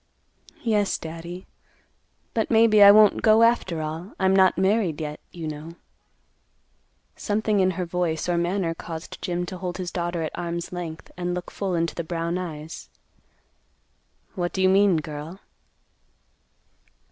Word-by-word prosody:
"Yes, 210 Hz, -4 st, +1 dB
Daddy; 170 Hz, +3 st, -8 dB, 0.9 s
but 225 Hz, -, 0 dB
maybe 220 Hz, -2 st, +5 dB
I 200 Hz, -, +11 dB
won't 210 Hz, 0 st, +6 dB
go 220 Hz, +1 st, +5 dB
after 190 Hz, -9 st, +2 dB
all. 160 Hz, +5 st, -6 dB
I'm 190 Hz, 0 st, +3 dB
not 190 Hz, -1 st, +4 dB
married, 190 Hz, -4 st, +1 dB
yet, 150 Hz, -1 st, -5 dB
you 165 Hz, -2 st, -6 dB
know." 155 Hz, +2 st, -7 dB, 1.4 s
Something 210 Hz, -1 st, 0 dB
in 185 Hz, -1 st, +4 dB
her 180 Hz, -, -1 dB
voice 170 Hz, -2 st, -2 dB
or 175 Hz, -, +1 dB
manner 170 Hz, 0 st, 0 dB
caused 165 Hz, 0 st, -8 dB
Jim 175 Hz, 0 st, -2 dB
to 185 Hz, 0 st, -7 dB
hold 180 Hz, -1 st, -4 dB
his 180 Hz, -1 st, -4 dB
daughter 175 Hz, -1 st, -2 dB
at 155 Hz, -, -3 dB
arm's 170 Hz, 0 st, -4 dB
length, 170 Hz, -3 st, -7 dB
and 175 Hz, 0 st, -2 dB
look 180 Hz, -, -6 dB
full 190 Hz, -3 st, -2 dB
into 165 Hz, -2 st, 0 dB
the 170 Hz, -, -4 dB
brown 170 Hz, +1 st, -2 dB
eyes; 160 Hz, -3 st, -7 dB, 1.4 s
"What 175 Hz, -1 st, -3 dB
do 190 Hz, -, -1 dB
you 185 Hz, -, +5 dB
mean, 195 Hz, -2 st, +4 dB
girl?" 155 Hz, +3 st, -6 dB
175 Hz, 145 wpm, -24 LUFS, 165-195 Hz, 1.4 s, I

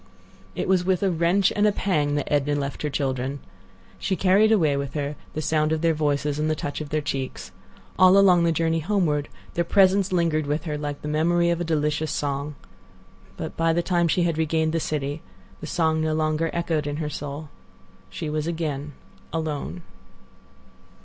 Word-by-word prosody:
It -, -, -2 dB
was 185 Hz, -1 st, +3 dB
with 185 Hz, +1 st, +1 dB
a 195 Hz, -, +2 dB
wrench 175 Hz, +3 st, +2 dB
and 210 Hz, +1 st, +3 dB
a -, -, +4 dB
pang 150 Hz, -8 st, 0 dB
that 145 Hz, 0 st, -2 dB
Edna 145 Hz, 0 st, +2 dB
left 140 Hz, -1 st, -3 dB
her 150 Hz, -, -1 dB
children. 135 Hz, -1 st, -2 dB, 0.6 s
She 190 Hz, -, -1 dB
carried 195 Hz, +4 st, +4 dB
away 160 Hz, -10 st, +3 dB
with 140 Hz, 0 st, -4 dB
her 145 Hz, 0 st, -2 dB, 0.2 s
the 155 Hz, -, -2 dB
sound 155 Hz, 0 st, +1 dB
of 160 Hz, -1 st, 0 dB
their 165 Hz, -1 st, +3 dB
voices 145 Hz, -1 st, 0 dB
and 155 Hz, +1 st, 0 dB
the 155 Hz, -, +1 dB
touch 145 Hz, 0 st, -4 dB
of 150 Hz, -, -6 dB
their 155 Hz, +1 st, 0 dB
cheeks. 135 Hz, -2 st, -4 dB, 0.5 s
All 185 Hz, +1 st, +7 dB
along 185 Hz, -3 st, +6 dB
the 170 Hz, -, +3 dB
journey 165 Hz, 0 st, +1 dB
homeward 160 Hz, -5 st, 0 dB, 0.2 s
their 170 Hz, -, +1 dB
presence 195 Hz, +1 st, +3 dB
lingered 165 Hz, -4 st, +1 dB
with 150 Hz, +2 st, -1 dB
her 155 Hz, -3 st, -3 dB
like 145 Hz, -1 st, -5 dB
the -, -, -4 dB
memory 170 Hz, +3 st, +2 dB
of 170 Hz, 0 st, -1 dB
a -, -, +1 dB
delicious 150 Hz, -1 st, 0 dB
song. 140 Hz, +1 st, -2 dB, 0.8 s
But -, -, -5 dB
by 165 Hz, 0 st, +2 dB
the 175 Hz, +1 st, +1 dB
time 175 Hz, -2 st, +2 dB
she 175 Hz, +2 st, +2 dB
had 165 Hz, -2 st, 0 dB
regained 160 Hz, 0 st, +1 dB
the 165 Hz, -, +1 dB
city 145 Hz, -1 st, -3 dB, 0.4 s
the -, -, -7 dB
song 160 Hz, -2 st, +1 dB
no 155 Hz, 0 st, 0 dB
longer 155 Hz, +1 st, 0 dB
echoed 165 Hz, -3 st, -1 dB
in 145 Hz, -, -2 dB
her 155 Hz, -1 st, -2 dB
soul. 145 Hz, +2 st, -6 dB, 0.6 s
She 95 Hz, +10 st, -5 dB
was 155 Hz, +1 st, -2 dB
again 150 Hz, -4 st, -3 dB, 0.4 s
alone. 150 Hz, -, -3 dB
155 Hz, 190 wpm, -24 LUFS, 145-170 Hz, 0.8 s, All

